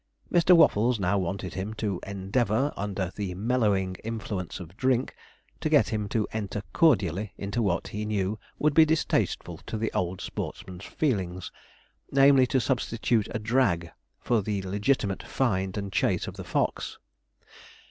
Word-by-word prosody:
Mr. 175 0 +6
Waffles 120 -5 +4
now 100 +1 +1
wanted 95 +1 -3
him, 100 +3 -4
to 100 -5 -2
endeavour, 110 +7 0
under 95 -2 -3
the 95 -3 -4
mellowing 100 -4 +1
influence 110 -5 -4
of 90 0 -10
drink, 130 +1 +1 0.5
to - - -1
get - - +4
him 105 -2 -2
to 110 -1 0
enter 105 -2 -3
cordially 105 - +2
into 100 +4 -2
what 95 -5 0
he 105 0 -4
knew 105 0 -1 0.2
would 150 0 +2
be 160 - +8
distasteful 155 0 0
to - - -5
the 110 +1 -2
old 90 +1 -1
sportsman's 95 0 -6
feelings, 95 - -2 0.6
namely, 135 -1 +6
to 130 - +2
substitute 115 -3 0
a - - -2
'drag' 105 -7 +1 0.3
for 120 -3 +1
the 100 -1 -2
legitimate 100 +1 0
find 95 -6 -1
and 100 -1 -4
chase - - +1
of - - -7
the - - -7
fox. - - -1
105 Hz, 150 wpm, -27 LUFS, 95-120 Hz, 0.6 s, be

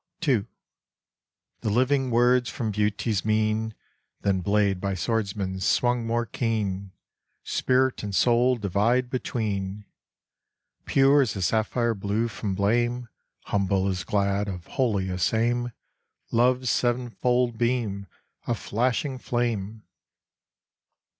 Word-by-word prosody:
II. 115 -6 +2 1.1
The - - -2
living 130 +4 +2
words 120 0 +3
from 110 +1 -3
Beauty's 105 0 0
mien, 110 0 0 0.5
Than 95 -2 +1
blade 100 -1 +1
by 100 -1 -1
swordsman 95 0 -2
swung 120 +4 +1
more 120 +1 0
keen, 100 -5 -2 0.5
Spirit 130 0 +1
and 100 -2 -4
soul 125 +3 +4
divide 115 +4 +1
between: 105 -5 -3 1.0
"Pure 140 +1 +5
as 120 -7 0
the 95 - -4
sapphire 115 +4 +1
blue 105 +3 -1
from 105 -3 -4
blame, 120 +4 0 0.3
Humble 100 -1 0
as 95 -2 -1
glad, 100 0 0
of 90 -3 -6
holiest 95 -7 0
aim 120 +2 +1 0.6
Love's 125 +2 +2
seven 120 0 0
fold 125 -1 0
beam 115 -5 -1 0.4
a 120 - +1
flashing 125 +5 -1
flame!" 110 -4 -2
110 Hz, 110 wpm, -26 LUFS, 100-120 Hz, 1.1 s, Pure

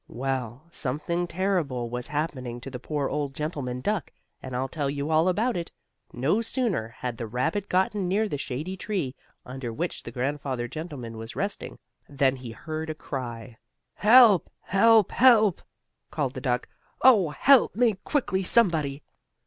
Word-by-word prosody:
Well, 130 0 -3
something 170 +5 -2
terrible 165 -9 -1
was 125 +1 -4
happening 140 -5 -3
to 135 - -8
the 125 - -6
poor 145 +1 -2
old 145 -2 -3
gentleman 140 -5 -3
duck, 205 +3 -1 0.3
and 130 - -6
I'll 130 +2 -1
tell 145 0 -2
you 140 +2 -3
all 160 +3 +4
about 225 +7 +1
it. 170 -1 -4 0.4
No 145 - +1
sooner 225 - -1
had 120 +1 -6
the 115 - -4
rabbit 160 - -1
gotten 190 +1 +1
near 210 +4 +1
the 145 -8 -4
shady 150 +9 -4
tree 185 -9 -3 0.3
under 125 -2 -5
which 165 +10 -3
the - - -8
grandfather 130 0 -2
gentleman 130 -6 -7
was 115 +1 -8
resting, 200 +1 -4 0.3
than 135 -2 +2
he 125 -2 -8
heard 155 +6 -5
a 155 - -3
cry: 120 -5 -6 0.3
"Help! 220 -3 +6
Help! 220 +1 +4
Help!" 220 -7 +5 0.5
called - - -2
the - - -6
duck. - - -1 0.4
"Oh, 210 -11 +6
help 260 - +4
me 235 -1 +3
quickly, 220 - 0
somebody!" 160 -9 +2
150 Hz, 155 wpm, -26 LUFS, 130-190 Hz, 0.5 s, Help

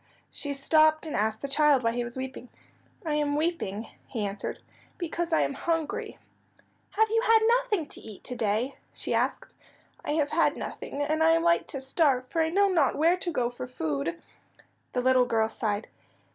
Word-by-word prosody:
She 285 -1 -4
stopped 310 +3 +4
and 310 - -4
asked 220 +2 0
the - - -1
child 285 -2 +3
why 230 - +2
he 240 +1 -2
was 240 +1 -7
weeping. 260 -1 -6 0.6
"I 310 - 0
am 295 -1 +1
weeping," 295 - -1 0.2
he 220 -5 -3
answered, 200 0 -4 0.4
"because 345 -1 -3
I 320 - +3
am - - 0
hungry." 340 +9 -2 0.7
"Have 440 0 +2
you 455 0 +3
had 455 -2 +5 0.2
nothing 420 -10 -1
to - - -10
eat 215 -3 -11
to 250 - -4
day?" 230 +3 -1
she - - -3
asked. - - -1 0.5
"I - - -1
have 300 -2 +1
had 330 - +2
nothing, 285 - -5
and 310 +2 0
I 325 +1 +6
am 330 0 +2
like 340 0 +3
to 275 - -5
starve, 265 -2 +1
for 330 - 0
I 320 - +2
know 400 +4 +3
not 320 -8 +2
where 335 +4 +3
to 360 -1 -3
go 245 -7 0
for 250 +1 -7
food." 160 - -3 0.7
The 250 - +1
little 255 0 +4
girl 225 -2 +1
sighed. 210 -1 -2
285 Hz, 190 wpm, -28 LUFS, 245-330 Hz, 0.7 s, I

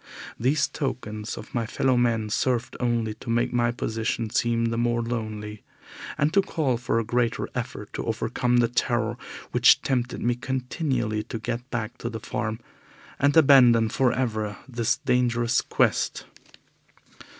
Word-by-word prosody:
These 140 +5 +2
tokens 115 -6 -4
of - - -10
my 115 -2 -1
fellow 130 +2 +1
men 115 -3 +1
served 125 +1 0
only 115 -3 0
to 115 - -10
make 120 +2 +1
my 120 -1 +2
own 120 - -1
position 115 -1 -2
seem 115 0 +1
the 115 0 -1
more 120 0 +1
lonely, 110 -3 -5 0.6
and 150 +2 +1
to 200 - +5
call 150 -9 -1
for 120 -1 -1
a 115 - +1
greater 120 +1 0
effort - - -5
to - - -4
overcome 115 +2 0
the 120 -1 +4
terror 120 - 0 0.4
which - - +5
tempted 125 -2 -1
me 120 +1 +1
continually 125 -3 -2
to 120 - -5
get 120 +3 -4
back 120 0 -4
to 120 - -3
the 115 -1 -6
farm, 105 +1 -3 0.6
and 145 +2 +3
abandon 125 -7 +6
for 125 +2 +2
ever 110 -5 -2
this 120 -3 0
dangerous 120 -1 +1
quest. - - 0
120 Hz, 155 wpm, -25 LUFS, 115-125 Hz, 0.6 s, abandon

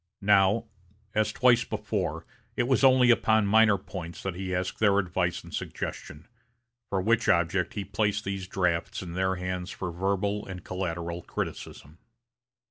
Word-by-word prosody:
Now, 100 +2 +4 0.5
as 110 0 +1
twice 120 -2 +4
before 105 -7 -3 0.3
it - - +1
was 130 0 +2
only 130 -2 +6
upon 110 -2 +3
minor 105 0 +5
points 90 -3 -8
that 95 - -2
he 95 0 -3
asked 90 +1 -3
their 100 -2 +4
advice 90 -2 -1
and - - -13
suggestion, 75 +2 -6 0.6
for 100 - 0
which 115 +4 +2
object 85 +1 +1
he 100 -2 -3
placed 105 +1 -1
these 100 -1 -4
drafts 90 -2 -1
in 85 -2 -7
their 95 +1 0
hands 90 0 -4
for 90 -4 -5
verbal 100 +3 -1
and 90 -2 -7
collateral 85 -2 -4
criticism. 80 -1 -6
95 Hz, 150 wpm, -27 LUFS, 90-105 Hz, 0.6 s, only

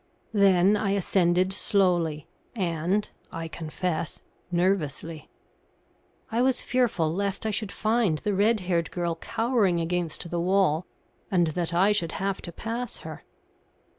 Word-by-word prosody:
Then 195 -1 +5
I 205 -1 0
ascended 185 -1 +2
slowly 175 -7 +1 0.3
and, 180 +1 0 0.2
I 165 0 -5
confess, 160 +1 -3 0.3
nervously. 165 -3 -1 1.0
I 230 +2 +1
was 260 0 +3
fearful 215 -11 +1
lest 200 +2 -2
I 220 - +1
should 210 0 -2
find 215 -7 +1
the 205 +6 -2
red 210 +2 +3
haired 175 -2 0
girl 170 -1 -1
cowering 210 0 +1
against 170 0 -2
the 175 - -1
wall, 180 -2 +2 0.4
and 175 -3 +3
that 170 +1 -2
I 185 +4 +4
should 175 -6 0
have 195 0 -2
to 170 - -7
pass 230 +7 -4
her. - - -8
185 Hz, 135 wpm, -26 LUFS, 170-205 Hz, 1.0 s, Then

